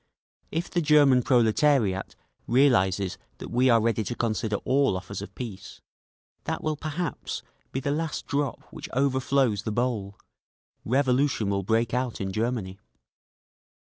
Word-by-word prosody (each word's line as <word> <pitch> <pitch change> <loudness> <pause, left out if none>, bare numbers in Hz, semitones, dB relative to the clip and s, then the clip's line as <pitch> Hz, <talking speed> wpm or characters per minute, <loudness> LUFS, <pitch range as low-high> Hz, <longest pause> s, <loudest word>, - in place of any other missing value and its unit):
If 165 +2 -2
the 175 - +1
German 145 -4 +5
proletariat 120 -4 +2 0.3
realises 100 -8 +2 0.2
that - - -8
we 125 +2 +3
are 115 -1 +6
ready 115 0 +1
to 120 - -3
consider 110 -2 -1
all 135 -7 +2
offers 95 +1 -7
of 100 - -9
peace, 110 -7 -8 0.7
that - - -3
will 155 -1 0
perhaps 155 +3 -4 0.3
be 135 - -3
the 140 - -1
last 155 +2 -2
drop 140 -2 -2
which - - -8
overflows 130 -4 +1
the 110 - -3
bowl—revolution 125 +2 -2
will 100 0 0
break 115 +4 0
out 125 -1 -1
in 95 -1 -3
Germany…. 110 -3 -2
120 Hz, 135 wpm, -26 LUFS, 105-140 Hz, 0.7 s, are